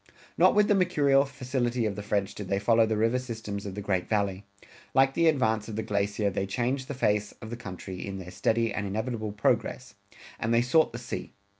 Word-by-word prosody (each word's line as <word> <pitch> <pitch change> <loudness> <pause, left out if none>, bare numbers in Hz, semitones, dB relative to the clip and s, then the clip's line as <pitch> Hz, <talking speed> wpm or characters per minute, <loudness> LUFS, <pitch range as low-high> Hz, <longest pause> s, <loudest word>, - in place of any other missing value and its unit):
Not - - +5
with 210 0 +5
the - - +4
mercurial 145 -7 +3
facility 125 -3 -2
of 105 -2 -1
the 105 - -5
French 100 -1 -1
did 105 - -7
they 100 - 0
follow 115 +3 +4
the 110 -1 0
river 115 +3 +2
systems 110 -5 -5
of 95 - -6
the 105 - -5
Great 95 -3 -1
Valley. 100 -2 -1 0.5
Like 135 0 +5
the 165 +2 +3
advance 110 -8 +2
of 110 - -6
the 110 - -2
glacier 100 0 0
they 95 0 -2
changed 125 +6 -1
the 140 - -5
face 105 -4 +1
of 110 - -10
the - - -3
country 95 -5 -7
in 100 -1 -5
their 90 -1 -8
steady 115 +5 +1
and 105 -1 -2
inevitable 110 +1 -3
progress, 115 +1 0 0.5
and 115 - -1
they 115 0 +4
sought 155 +6 +3
the 120 - -6
sea. 120 - -6
110 Hz, 215 wpm, -28 LUFS, 100-125 Hz, 0.5 s, Not